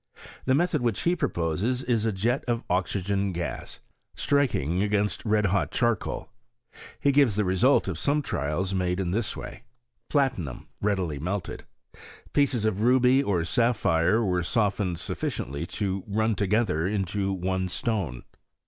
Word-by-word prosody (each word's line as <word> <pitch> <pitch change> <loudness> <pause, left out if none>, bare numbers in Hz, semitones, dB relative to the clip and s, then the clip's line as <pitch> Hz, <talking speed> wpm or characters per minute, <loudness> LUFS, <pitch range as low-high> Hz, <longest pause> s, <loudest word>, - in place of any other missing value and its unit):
The 130 - +3
method 165 -2 +1
which 115 -4 0
he 175 +1 +2
proposes 115 - -1
is 115 -3 +1
a - - +2
jet 115 +7 0
of 120 -1 0
oxygen 95 +2 0
gas, 85 -8 -5 0.4
striking 95 - +1
against 105 -2 0
red 105 -1 +2
hot 100 +1 +1
char 120 -1 +2
coal. - - -6 0.7
He 140 - +3
gives 135 -7 +4
the 105 -1 +1
result 95 +10 +3
of - - -3
some 145 +1 +1
trials 90 - -2
made 90 -1 0
in 90 -2 -1
this 110 +3 -1
way. - - -8 0.5
Platinum 115 - 0 0.2
readily 95 -8 0
melted. 95 +5 -4 0.7
Pieces 130 -6 +2
of 105 -2 0
ruby 125 +2 +5
or 95 -10 0
sapphire 110 -1 +2
were 90 -2 +1
softened 100 -1 0
sufficiently 70 +2 -4
to 95 -2 -2
run 110 +2 +1
together 100 -4 +1
into 100 0 -1
one 95 0 -1
stone. 90 - -2
100 Hz, 145 wpm, -26 LUFS, 90-120 Hz, 0.7 s, ruby